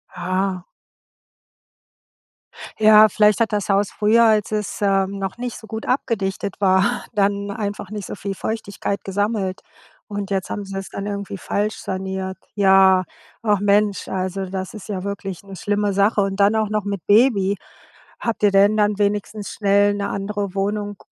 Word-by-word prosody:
Aha. 185 Hz, 0 st, -1 dB, 2.2 s
Ja, 215 Hz, 0 st, +7 dB
vielleicht 210 Hz, 0 st, +3 dB
hat 225 Hz, -1 st, +1 dB
das 205 Hz, -1 st, -1 dB
Haus 200 Hz, 0 st, +2 dB
früher, 220 Hz, +2 st, +3 dB
als 215 Hz, -2 st, +2 dB
es, 210 Hz, 0 st, -3 dB
ähm, 195 Hz, -1 st, +1 dB
noch 195 Hz, +1 st, -4 dB
nicht 245 Hz, -1 st, -5 dB
so -, -, -12 dB
gut 220 Hz, 0 st, -6 dB
abgedichtet 200 Hz, -7 st, -1 dB
war, 195 Hz, +5 st, +3 dB
dann 200 Hz, -1 st, 0 dB
einfach 205 Hz, -1 st, -4 dB
nicht 210 Hz, -2 st, -6 dB
so -, -, -7 dB
viel 195 Hz, -1 st, -5 dB
Feuchtigkeit 200 Hz, -1 st, -4 dB
gesammelt. 200 Hz, -1 st, -2 dB, 0.5 s
Und 205 Hz, -1 st, -5 dB
jetzt 195 Hz, -2 st, -2 dB
haben 205 Hz, -, -3 dB
sie 195 Hz, 0 st, -7 dB
es 195 Hz, -, -6 dB
dann 200 Hz, -, -5 dB
irgendwie 200 Hz, -1 st, -4 dB
falsch 210 Hz, +4 st, -1 dB
saniert. 190 Hz, 0 st, -4 dB, 0.2 s
Ja, 190 Hz, -2 st, +5 dB, 0.4 s
ach 210 Hz, -3 st, +2 dB
Mensch, 205 Hz, 0 st, +2 dB
also 190 Hz, +1 st, -3 dB
das 185 Hz, 0 st, -5 dB
ist 210 Hz, 0 st, -10 dB
ja 190 Hz, -3 st, -3 dB
wirklich 195 Hz, -2 st, -5 dB
'ne 195 Hz, -1 st, -10 dB
schlimme 205 Hz, +1 st, 0 dB
Sache 200 Hz, +2 st, +2 dB
und 195 Hz, 0 st, -2 dB
dann 200 Hz, +2 st, +4 dB
auch 220 Hz, -1 st, +1 dB
noch 210 Hz, -1 st, -1 dB
mit 200 Hz, -4 st, -4 dB
Baby. 205 Hz, -3 st, +4 dB, 0.6 s
Habt 230 Hz, -2 st, -3 dB
ihr 205 Hz, -, +5 dB
denn 200 Hz, +2 st, +4 dB
dann 210 Hz, -1 st, +2 dB
wenigstens 205 Hz, 0 st, -1 dB
schnell 205 Hz, 0 st, +2 dB
'ne 200 Hz, 0 st, -2 dB
andere 200 Hz, -1 st, -3 dB
Wohnung 205 Hz, +1 st, -2 dB
200 Hz, 165 wpm, -21 LUFS, 195-210 Hz, 2.2 s, Ja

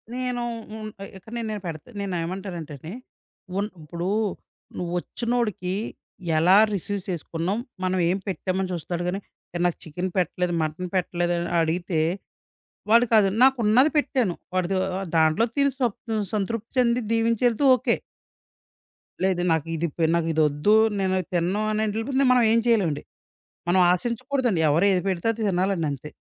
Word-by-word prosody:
నేను 250 Hz, -1 st, -2 dB, 0.3 s
హ్మ్. 215 Hz, 0 st, -6 dB
ఎ -, -, -5 dB
ఇక్కడ 190 Hz, +4 st, -15 dB, 0.2 s
నేను 210 Hz, -1 st, -4 dB
పెడతే 160 Hz, +5 st, -7 dB
నేనేమంటానంటే 180 Hz, -3 st, -4 dB
అండి. 160 Hz, +7 st, -8 dB, 0.6 s
ఉన్ 205 Hz, +1 st, -1 dB
ఇప్పుడు 170 Hz, +3 st, -5 dB, 0.7 s
నువ్వొచ్చినోడికి 185 Hz, +2 st, -2 dB, 0.6 s
ఎలా 180 Hz, +5 st, +6 dB, 0.2 s
రిసీవ్ 200 Hz, +1 st, -2 dB
సేసుకున్నాం. 170 Hz, +2 st, -2 dB, 0.3 s
మనం 185 Hz, 0 st, +1 dB
ఏం 185 Hz, -, +1 dB
పెట్టామని 190 Hz, 0 st, -2 dB
చూస్తాడు 175 Hz, +1 st, -3 dB
గానీ, 185 Hz, +2 st, -1 dB, 0.5 s
నాకు 175 Hz, -, +1 dB
చికెన్ 175 Hz, +4 st, -4 dB
పెట్టలేదు. 180 Hz, 0 st, 0 dB
మటన్ 160 Hz, +4 st, -4 dB
పెట్టలేదు. 175 Hz, -1 st, 0 dB
అని 170 Hz, 0 st, -3 dB
అడిగితే 165 Hz, +1 st, -1 dB, 0.9 s
వాడు 235 Hz, +2 st, +6 dB
కాదు, 210 Hz, -3 st, +6 dB
నాకున్నది 255 Hz, +1 st, +5 dB
పెట్టాను. 255 Hz, -10 st, +1 dB, 0.2 s
వాడు 185 Hz, -1 st, +1 dB
దు -, -, +1 dB, 0.4 s
దాంట్లో 160 Hz, +7 st, +4 dB
తిని 280 Hz, 0 st, +4 dB
స్వప్ 245 Hz, -6 st, 0 dB, 0.4 s
సంతృప్తి 215 Hz, +2 st, -2 dB
చెంది 245 Hz, -1 st, +3 dB
దీవించెళ్తే 230 Hz, +3 st, +2 dB
ఓకే. 250 Hz, -, +1 dB, 1.3 s
లేదు. 190 Hz, -2 st, +2 dB
నాకు 160 Hz, -1 st, +1 dB
ఇది 165 Hz, +1 st, -1 dB
ఇప్ 160 Hz, -, -7 dB
నాకు 170 Hz, -1 st, 0 dB
ఇదొద్దు. 155 Hz, +6 st, +3 dB, 0.2 s
నేను 190 Hz, -1 st, +1 dB
అది 185 Hz, -, -2 dB
తినను 180 Hz, +5 st, +1 dB
అనేళ్ళిపోతే. 225 Hz, +6 st, 0 dB
మనం 250 Hz, -1 st, +4 dB
ఏం 230 Hz, -, +4 dB
చేయలేమండి. 185 Hz, -11 st, +2 dB, 0.7 s
మనం 185 Hz, +1 st, +4 dB
ఆశించకూడదండి. 240 Hz, -, 0 dB
ఎవరు 165 Hz, +7 st, +3 dB
ఏది 180 Hz, -1 st, +1 dB
పెడితే 185 Hz, +3 st, -1 dB
అది 225 Hz, 0 st, -6 dB
తినాలండంతే. 175 Hz, -7 st, -1 dB
190 Hz, 135 wpm, -25 LUFS, 170-225 Hz, 1.3 s, ఎలా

